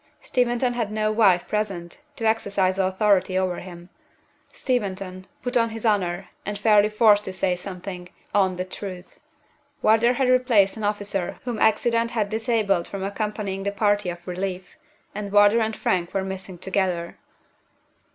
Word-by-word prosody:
Steventon 245 0 +1
had 230 -4 -2
no 215 0 0
wife 200 -5 +3
present 195 -1 -3
to 225 - -4
exercise 200 -4 +1
authority 190 0 +2
over 185 -1 0
him. 175 -1 -11 0.6
Steventon, 195 -6 -3 0.2
put 245 +1 -3
on 230 -1 +3
his 225 +1 -7
honor, 190 -4 0
and 205 0 -4
fairly 210 0 +4
forced 210 -1 +4
to - - -4
say 185 -1 0
something, 180 -1 -8 0.2
owned 190 -3 +2
the 185 - -2
truth. 185 -1 -8 0.6
Wardour 225 +3 +4
had 260 +1 +1
replaced 245 -6 +4
an 220 - -7
officer 205 -3 -2
whom 240 -3 -4
accident 230 +1 +2
had 220 -4 -1
disabled 220 -5 0
from 195 -1 -5
accompanying 200 -1 -3
the 200 +1 -1
party 205 -2 +1
of 175 0 -8
relief, 185 0 -4 0.4
and 205 -1 -5
Wardour 205 +2 +5
and 220 -1 -1
Frank 175 0 -1
were 195 - +1
missing 190 -1 -7
together. 185 -2 -2
200 Hz, 150 wpm, -24 LUFS, 185-220 Hz, 0.6 s, Wardour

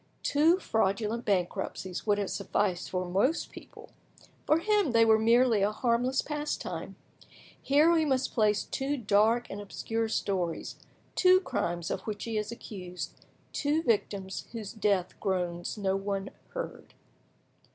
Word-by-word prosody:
Two 315 +5 +4
fraudulent 220 - 0
bankruptcies 185 0 -2
would 205 -1 +3
have 200 -2 -2
sufficed 195 -2 -1
for 185 -1 -2
most 200 - +1
people; 460 0 -13 0.6
for 305 - +5
him 410 - +2
they 230 0 +6
were 220 -1 +5
merely 230 -1 +4
a 200 +2 +3
harmless 245 +3 +1
pastime. 300 0 -4 0.7
Here 295 +4 +4
we 330 -2 +4
must 265 -3 0
place 210 -3 +2
two 280 +2 -2
dark 220 +1 +3
and 205 - -5
obscure 225 +2 -3
stories, 185 -6 -2 0.4
two 370 0 +6
crimes 175 - -2
of - - -2
which 210 -1 -4
he 230 -1 -3
is 210 +1 -2
accused, 185 -6 -7 0.4
two 300 +2 +1
victims 200 - -1
whose 220 -3 -6
death 200 -5 +1
groans 175 -1 -2
no 195 -2 0
one 195 0 -3 0.2
heard. - - -6
220 Hz, 140 wpm, -29 LUFS, 195-265 Hz, 0.7 s, they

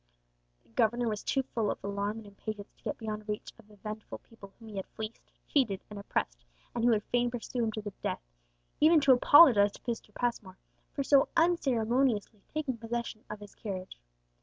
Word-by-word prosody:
The - - -30
governor 235 - +2
was 215 -2 -2
too 270 - 0
full 225 -5 -1
of - - -1
alarm 200 +2 -2
and 225 - -9
impatience 205 0 -7
to - - -30
get - - -2
beyond 215 -1 -5
reach 210 - -4
of - - -17
the 210 - -17
vengeful 215 +1 -7
people 200 -4 -15
whom 225 -2 -12
he 205 - -7
had 190 - -4
fleeced, 220 +1 -7 0.3
cheated, 225 -10 +1
and 205 - -6
oppressed, - - -2 0.3
and 235 - -2
who 240 - +5
would 215 -3 +3
fain 245 0 +3
pursue 245 0 -3
him 220 - -1
to 215 - -5
the 205 -1 -6
death, - - -2 0.6
even 320 +1 +7
to 275 -1 +5
apologize 245 -6 +7
to - - -13
Mr. 230 -3 -4
Passmore 215 -6 -2 0.4
for 280 - 0
so 275 0 +5
unceremoniously 250 - +2
taking 285 -6 -2
possession 230 -1 -4
of 210 0 -7
his 205 -1 -11
carriage. 185 - -6
220 Hz, 195 wpm, -31 LUFS, 205-245 Hz, 0.6 s, even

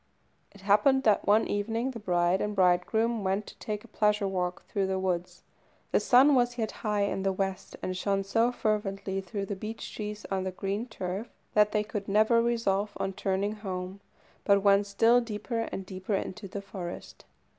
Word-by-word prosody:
It 200 - -16
happened 215 +7 +4
that 215 -4 +3
one 210 +2 +5
evening 225 +5 -1
the 235 - -7
bride 175 -2 +1
and 210 0 -2
bridegroom 200 +5 +2
went 195 +2 0
to - - -12
take 210 -1 -4
a - - -14
pleasure 210 -1 +1
walk 180 -2 -2
through 195 -1 -1
the 190 0 -1
woods. 180 -2 -2 0.5
The - - +4
sun 270 +3 +6
was 245 -1 +2
yet 220 -2 -1
high 210 -2 +1
in 200 -1 -1
the 195 0 +1
west, 190 0 -3
and 185 - -2
shone 195 +1 0
so 225 +5 +2
fervently 195 -4 -1
through 195 +2 -4
the 200 - -4
beech 215 +3 -7
trees 210 -1 -5
on 190 -1 0
the 190 - -2
green 195 +5 -3
turf 195 +1 -5 0.2
that 210 0 +4
they 210 0 +1
could 210 -2 -5
never 220 +3 +4
resolve 210 -4 0
on 195 - -2
turning 200 +2 -1
home, 190 -2 -5 0.4
but 200 -1 +4
went 200 0 +4
still 225 +5 +4
deeper 230 +1 -3
and 190 - -5
deeper 190 +2 -3
into 195 +1 -4
the 200 +1 -6
forest. 185 -3 -8
200 Hz, 190 wpm, -29 LUFS, 190-220 Hz, 0.5 s, sun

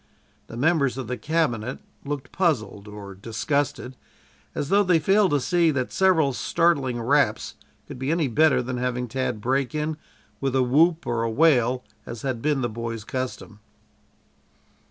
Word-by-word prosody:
The 115 - -9
members 140 -2 +2
of 130 - -4
the 125 - -3
cabinet 130 -4 -1 0.3
looked 140 -2 -5
puzzled 110 - -1
or 105 -1 -9
disgusted, 125 +6 -2 0.6
as 145 - -3
though 200 +1 +5
they 180 -4 +3
failed 195 +5 +3
to 145 - +2
see 170 +4 +2
that 130 -4 -2
several 165 -8 +3
startling 140 -5 +1
raps 140 +6 +1 0.3
could - - -9
be 130 +1 -2
any 165 -2 +1
better 150 +2 +3
than 125 +1 -4
having 125 0 -2
Tad 125 -1 -2
break 135 +5 -1
in 155 0 -2 0.4
with 135 -1 -1
a 130 - +3
whoop 160 +7 +3
or 120 -1 -1
a 115 - 0
wail, 125 -2 +3 0.2
as 120 -2 -7
had 130 -4 -2
been 145 -1 +1
the 120 - 0
boy's 115 -1 -5
custom. 125 -3 -5
130 Hz, 160 wpm, -24 LUFS, 120-155 Hz, 0.6 s, though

